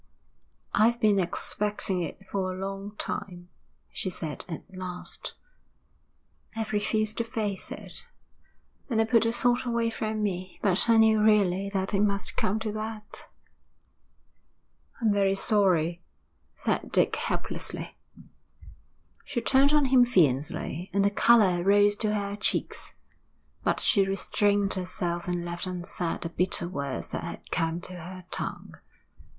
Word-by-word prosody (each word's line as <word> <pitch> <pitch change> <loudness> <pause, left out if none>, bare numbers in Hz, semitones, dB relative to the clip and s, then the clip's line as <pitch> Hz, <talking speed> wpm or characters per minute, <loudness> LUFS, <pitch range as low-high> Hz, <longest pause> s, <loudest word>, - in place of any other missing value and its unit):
'I've 230 +3 +4
been 210 -3 +4
expecting 190 +1 -1
it 170 +4 -6
for 190 -1 -2
a 185 - -6
long 195 +2 -5
time,' 180 -3 -5 0.4
she 185 - -2
said 160 -4 -3
at 165 - -5
last. 180 -1 -6 1.2
'I've 220 -1 -3
refused 215 +1 0
to - - +2
face 215 -4 -3
it, - - -6 0.8
and 230 -3 +1
I - - +5
put 225 0 +4
the 230 - +2
thought 245 +1 +2
away 235 -2 0
from 215 -1 -2
me, 185 -2 -3
but 200 +3 +3
I 230 - +6
knew 220 -1 +5
really 200 -3 +3
that 195 0 -2
it 195 - +2
must 200 -1 +1
come 200 +3 +1
to 220 -1 -2
that.' 215 0 -6 1.7
'I'm 220 -4 +2
very 195 -1 +2
sorry,' 175 -5 +2 0.5
said - - -1
Dick - - +3
helplessly. - - -4 1.3
She 275 - -2
turned 270 +4 +4
on 300 -2 +4
him 260 -1 +6
fiercely, 165 - +1
and 200 0 +3
the 200 - +3
colour 205 -5 +5
rose 205 +1 +5
to 215 -1 0
her 200 -1 -2
cheeks. 210 - -1 0.7
But - - +1
she 200 -5 +4
restrained 200 +1 +1
herself 180 -2 -3
and 175 -1 -2
left 175 +1 -4
unsaid 175 -1 -3
the 165 - -3
bitter 175 0 0
words 140 -6 -4
that - - -3
had - - -8
come 165 +1 0
to 180 0 -7
her 180 +2 -9
tongue. - - -4
200 Hz, 140 wpm, -27 LUFS, 180-215 Hz, 1.7 s, I